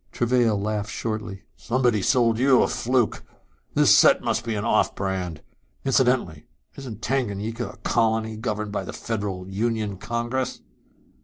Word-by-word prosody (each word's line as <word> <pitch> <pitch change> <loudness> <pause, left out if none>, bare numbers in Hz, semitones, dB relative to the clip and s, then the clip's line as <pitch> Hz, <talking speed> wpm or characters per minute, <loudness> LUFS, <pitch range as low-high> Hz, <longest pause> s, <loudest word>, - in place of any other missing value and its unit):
Travail 120 -3 +2
laughed 105 0 -2
shortly. 110 -3 -4
"Somebody 120 -3 +1
sold 115 +2 +2
you 130 0 +5
a - - +1
fluke. 125 -2 0 0.5
This - - +6
set - - +5
must 110 - 0
be 115 -2 -2
an 105 +1 -3
off 110 -2 +2
brand. 95 -5 -3 0.4
Incidentally, 125 - +1 0.3
isn't 115 -5 -8
Tanganyika 115 -2 -2
a - - -13
colony 110 -1 0
governed 110 -2 -3
by - - -2
the - - -7
Federal 100 -5 -4
Union 105 0 -2
Congress?" 120 +4 -3
110 Hz, 140 wpm, -24 LUFS, 105-120 Hz, 0.5 s, This